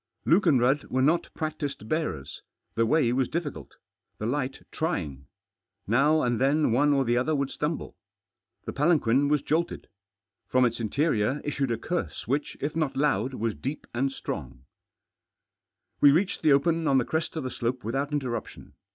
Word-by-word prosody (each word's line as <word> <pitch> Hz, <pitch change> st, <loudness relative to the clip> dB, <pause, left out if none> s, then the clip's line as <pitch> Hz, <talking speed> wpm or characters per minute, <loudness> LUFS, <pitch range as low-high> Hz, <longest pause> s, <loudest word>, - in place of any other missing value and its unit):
Luke 180 Hz, +3 st, +4 dB
and 140 Hz, -6 st, +5 dB
Rudd 135 Hz, +4 st, +2 dB
were 130 Hz, +1 st, 0 dB
not 160 Hz, +5 st, +2 dB
practised 150 Hz, -7 st, -4 dB
beards. 110 Hz, -, -3 dB, 0.3 s
The 115 Hz, 0 st, +1 dB
Way 140 Hz, -3 st, +3 dB
wals 130 Hz, 0 st, +1 dB
difficult. 165 Hz, -4 st, -5 dB, 0.4 s
The 105 Hz, -, -4 dB
light 130 Hz, +2 st, -2 dB
trying. 75 Hz, -, -3 dB, 0.6 s
Now 145 Hz, +8 st, +3 dB
and 120 Hz, -2 st, 0 dB
tiien 140 Hz, +1 st, +2 dB
One 145 Hz, +5 st, +3 dB
or 135 Hz, -2 st, +2 dB
the 120 Hz, +1 st, +2 dB
other 150 Hz, +5 st, +1 dB
would 140 Hz, -1 st, -1 dB
stumble. 150 Hz, +1 st, -3 dB, 0.7 s
The -, -, -4 dB
palanquin 140 Hz, -3 st, +3 dB
was 150 Hz, 0 st, +1 dB
joltfed. 170 Hz, +2 st, -1 dB, 0.6 s
From 130 Hz, 0 st, +3 dB
its 120 Hz, -1 st, -1 dB
interior 130 Hz, +2 st, +1 dB
issued 140 Hz, -2 st, -1 dB
a 115 Hz, -, 0 dB
curse 175 Hz, +9 st, -4 dB
which, 140 Hz, +4 st, -1 dB
if 145 Hz, +2 st, -2 dB
hot 155 Hz, -5 st, -1 dB
loud, 135 Hz, -3 st, +1 dB
was 115 Hz, -2 st, -1 dB
deep 140 Hz, +7 st, -5 dB
and 135 Hz, +3 st, 0 dB
strong; 65 Hz, -, -6 dB, 1.3 s
We 145 Hz, -, +8 dB
reached 180 Hz, +7 st, +1 dB
the 155 Hz, -, +4 dB
open 160 Hz, +3 st, +3 dB
on 135 Hz, -, +4 dB
the 125 Hz, -, +2 dB
crest 160 Hz, +1 st, -2 dB
of 160 Hz, -, -3 dB
the 130 Hz, -, -4 dB
slope 120 Hz, +2 st, -3 dB
without 135 Hz, +6 st, -1 dB
irtterruptioh. 130 Hz, -5 st, -4 dB
140 Hz, 170 wpm, -27 LUFS, 120-155 Hz, 1.3 s, We